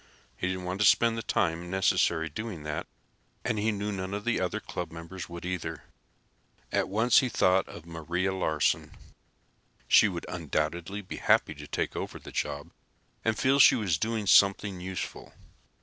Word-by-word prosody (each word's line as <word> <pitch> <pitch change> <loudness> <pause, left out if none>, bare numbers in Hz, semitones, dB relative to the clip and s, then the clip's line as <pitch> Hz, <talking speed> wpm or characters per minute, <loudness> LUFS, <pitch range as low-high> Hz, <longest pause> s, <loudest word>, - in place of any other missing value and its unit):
He 90 - -2
didn't 95 0 -3
want 90 +3 -3
to 105 - +6
spend 115 -1 +4
the 115 - -3
time 85 -4 -1
necessary 85 -3 +2
doing 90 0 -6
that, 75 0 -4 0.6
and 110 -2 0
he 110 +2 +1
knew 105 0 -3
none 95 0 -4
of 105 - -5
the 120 -4 +1
other 90 -1 -1
club 90 -2 -6
members 85 +3 -8
would, 85 0 -8
either. 90 -2 -4 0.9
At - - 0
once 110 +5 +4
he 130 -3 0
thought 95 -4 +3
of 85 - -11
Maria 85 +3 -2
Larsen. 80 -5 0 0.9
She 110 - +7
would 90 -4 -5
undoubtedly 85 +4 -3
be 90 - -7
happy - - +3
to 75 0 -10
take - - -2
over - - -4
the - - -11
job 75 +4 -3 0.5
and 110 -1 +1
feel 135 +2 +3
she - - +8
was 95 -9 0
doing 110 +1 -1
something 100 -1 +4
useful. 95 0 -6
95 Hz, 170 wpm, -28 LUFS, 85-105 Hz, 0.9 s, she